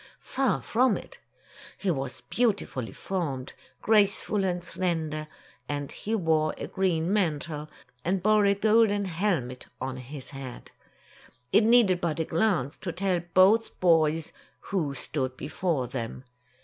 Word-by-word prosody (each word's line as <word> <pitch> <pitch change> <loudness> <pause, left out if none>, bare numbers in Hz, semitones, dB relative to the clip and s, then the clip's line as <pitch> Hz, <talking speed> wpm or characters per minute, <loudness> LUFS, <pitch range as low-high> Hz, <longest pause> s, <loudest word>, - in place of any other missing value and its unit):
Far 270 -1 0
from 245 0 +2
it. - - -11 0.6
He 195 - 0
was 135 -4 -4
beautifully 200 - -1
formed, 145 -9 -4 0.3
grace 210 -2 +4
ful 205 -2 -1
and 180 -2 -1
slender, 160 -4 -2 0.4
and 145 -1 -3
he 220 +2 -3
wore 160 -5 +1
a - - -4
green 180 -2 0
mantle, 155 -5 -1 0.3
and 180 +1 0
bore 215 0 +4
a 200 - +4
golden 210 -1 +3
helmet 165 -9 -2
on 130 0 -4
his 130 +1 -7
head. 135 -3 -8 0.8
It 215 - +6
needed 220 -6 +5
but 165 -1 -1
a 160 - +1
glance 165 - 0
to 180 - -4
tell 185 +1 0 0.2
both 205 +5 +4
boys 160 -2 +3 0.4
who 155 -8 0
stood 130 -1 -3
before 150 -2 -1
them. 120 0 -5
175 Hz, 135 wpm, -27 LUFS, 145-200 Hz, 0.8 s, It